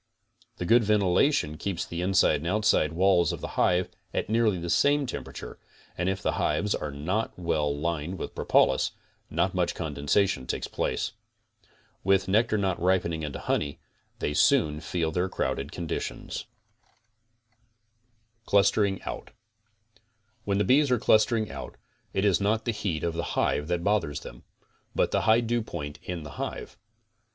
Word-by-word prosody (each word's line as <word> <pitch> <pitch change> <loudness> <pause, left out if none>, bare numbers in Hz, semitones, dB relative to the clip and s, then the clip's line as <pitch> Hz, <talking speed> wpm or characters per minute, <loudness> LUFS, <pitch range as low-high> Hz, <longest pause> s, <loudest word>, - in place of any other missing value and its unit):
The 90 - -3
good 115 +5 +5
ventilation 100 - +2
keeps 90 -2 -3
the 85 +1 -5
inside 90 -4 +3
and 80 +3 -5
outside 105 -5 +2
walls 90 -1 +3
of - - -5
the - - -5
hive 90 +1 +2 0.3
at - - -1
nearly 110 -4 +3
the 85 0 -5
same 140 - +3
temperature 120 - -7 0.4
and 90 +2 0
if 95 0 -3
the - - +2
hives 80 +8 +1
are 75 - -3
not 85 +11 -2
well 75 -4 0
lined 85 +3 -2
with - - -6
propolis, 65 - +2 0.4
not 85 +3 0
much 90 -2 0
condensation 75 0 0
takes - - -2
place. - - -2 0.9
With 95 -1 +3
nectar 110 +3 +2
not 95 -4 -1
ripening 85 -3 +1
into 75 -2 -4
honey, 70 -1 -2 0.4
they 75 - -2
soon 75 +1 +3
feel 80 0 -2
their 90 +3 0
crowded 70 -5 -2
condition. 85 -2 -5 2.2
CLUSTERING 100 -1 +3
OUT - - -6 1.2
When 100 -1 +1
the 105 - +3
bees 140 +4 +4
are 125 - +3
clustering 110 0 +3
out, - - -8 0.3
it 95 +1 0
is 100 -2 +3
not 110 +2 +1
the 120 - +1
heat 95 -7 -3
of 85 - 0
the 85 +1 -2
hive 75 - +1
that 85 0 -1
bothers 95 -8 0
them, - - -11 0.5
but - - +2
the - - +2
high 115 +1 +4
dewpoint 110 -11 -3
in 90 -3 -5
the 75 - -8
hive. - - -5
90 Hz, 155 wpm, -27 LUFS, 80-105 Hz, 2.2 s, good